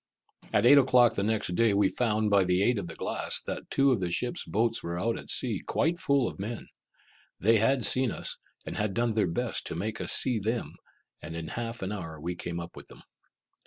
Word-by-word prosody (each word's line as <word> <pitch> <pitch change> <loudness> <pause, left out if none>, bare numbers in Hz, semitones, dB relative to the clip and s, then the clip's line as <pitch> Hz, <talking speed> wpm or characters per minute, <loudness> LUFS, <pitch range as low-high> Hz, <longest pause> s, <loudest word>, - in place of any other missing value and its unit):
At - - +2
eight 140 +3 +8
o'clock 125 -3 +5
the - - -2
next 105 -3 0
day 110 +1 +3
we 100 -1 +4
found, 110 -1 0
by 100 -1 +5
the 90 +1 +2
aid 120 0 +2
of 90 - -5
the 85 - -7
glass, - - -1
that - - -5
two 140 0 +3
of 120 - +1
the 90 -2 -2
ship's 120 +8 -2
boats 115 +2 0
were 85 +1 -4
out 115 +4 0
at - - -9
sea, - - 0
quite 170 +3 0
full 140 -5 +2
of - - -7
men. 110 +3 -5 0.7
They 110 +5 +4
had 120 +4 +2
seen 130 -1 +3
us, - - -4 0.3
and - - -6
had 105 -2 -1
done 120 0 +1
their 105 -3 +1
best 120 +8 -2
to - - -4
make 105 +6 -4
us - - -1
see 125 -4 +2
them, 115 +4 -2 0.5
and 80 +2 -7
in 80 -1 -5
half 115 -2 -5
an 95 - -3
hour 80 -6 -6
we 85 +4 -3
came 85 0 -5
up 85 0 -8
with - - -11
them. - - -15
110 Hz, 230 wpm, -28 LUFS, 95-120 Hz, 0.7 s, eight